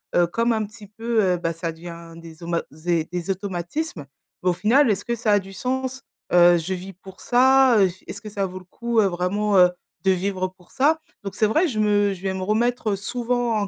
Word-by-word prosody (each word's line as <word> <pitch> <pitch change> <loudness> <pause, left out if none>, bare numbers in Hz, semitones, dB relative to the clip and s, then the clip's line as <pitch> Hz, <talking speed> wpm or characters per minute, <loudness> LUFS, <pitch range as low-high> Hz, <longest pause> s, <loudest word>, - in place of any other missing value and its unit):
heu, 175 -1 +4
comme 230 +6 0
un 220 -1 -1
petit 215 -1 -13
peu, 225 +1 0
heu, 180 -1 +2
bah, 165 -1 -2
ça 165 0 -4
devient 170 0 -10
des 165 0 -12
auma 170 0 -1
zé 160 +1 -1
des 180 +1 -2
automatismes, 190 - -4 0.4
bah 180 - +3
au - - 0
final 225 +7 +3
est-ce 205 0 -2
que 235 - -1
ça 225 -2 0
a 205 - +5
du 195 0 -11
sens? 260 +3 -3 0.3
Heu, 175 0 +7
je 170 +3 -3
vis 190 +1 -7
pour 190 +1 -14
ça, 260 -1 +5
heu, 190 -2 +5 0.2
est-ce 205 - -7
que 215 - -8
ça 200 -1 -2
vaut 185 0 -8
le 185 - -17
coup, 235 +4 -1
heu, 205 - +5
vraiment, 195 +3 0
heu, 180 -1 +7 0.3
de 190 - +4
vivre 185 0 -1
pour 180 - -22
ça?» 305 +4 +2 0.2
donc 195 - -6
c'est 215 - +2
vrai 315 - +2
je 220 -7 -3
me 205 -1 +3
je 185 - -11
vais 190 -1 -1
me 190 - -4
remettre 220 0 +1
souvent 240 +3 -1
en 205 -1 -1
200 Hz, 235 wpm, -23 LUFS, 180-230 Hz, 0.4 s, Heu